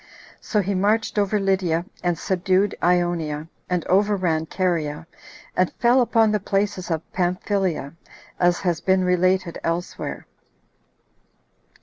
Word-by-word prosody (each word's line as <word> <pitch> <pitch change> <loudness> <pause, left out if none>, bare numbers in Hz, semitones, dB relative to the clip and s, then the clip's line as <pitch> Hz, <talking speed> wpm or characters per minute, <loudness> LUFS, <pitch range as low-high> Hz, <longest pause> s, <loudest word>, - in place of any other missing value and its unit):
So 210 - 0
he 200 +1 -2
marched 210 +3 +1
over 205 +1 +1
Lydia, 185 -4 +1 0.2
and 175 -2 +1
subdued 190 +3 +1
Ionia, 170 -4 0 0.2
and 180 -2 -1
overran 185 -5 +1
Caria, 165 -4 -1 0.5
and 185 -1 +2
fell 245 +2 +3
upon 225 -2 +3
the 210 - +1
places 195 -1 -1
of 165 -1 -1
Pamphylia, 180 -4 -1 0.5
as 175 -1 +2
has 170 -3 0
been 190 -1 +2
related 180 -1 +1
elsewhere. 170 +2 -3
185 Hz, 115 wpm, -23 LUFS, 170-200 Hz, 0.5 s, fell